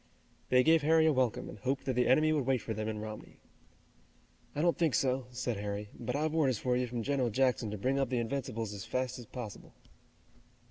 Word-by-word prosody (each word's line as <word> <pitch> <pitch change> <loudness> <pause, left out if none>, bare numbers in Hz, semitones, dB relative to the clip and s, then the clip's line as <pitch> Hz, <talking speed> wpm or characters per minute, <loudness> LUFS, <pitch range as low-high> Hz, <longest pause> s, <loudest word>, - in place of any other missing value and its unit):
They 125 0 +5
gave 160 +2 +5
Harry 160 +2 +4
a 160 - +4
welcome 130 -4 0
and 105 - -9
hoped 135 +5 -2
that 130 - 0
the 125 0 +2
enemy 155 +3 +4
would 145 -5 0
wait 135 -1 +3
for 110 - -3
them 110 0 -3
in 110 -1 -3
Romney. 110 0 -8 1.2
"I 150 - 0
don't 170 -1 +3
think 165 -5 +1
so," 130 -1 +1
said 125 -2 -3
Harry, 105 0 -4
"but 120 - -4
I've 155 +1 0
orders 140 -7 +2
for 125 +3 0
you 125 0 0
from 120 -1 -3
General 135 -2 +1
Jackson 125 -1 +1
to 105 - -4
bring 130 +7 0
up 135 -3 0
the 125 - 0
Invincibles 115 -3 -3
as 100 -2 -6
fast 130 0 -2
as 120 - -10
possible." 120 -6 -8
125 Hz, 220 wpm, -32 LUFS, 115-140 Hz, 1.2 s, They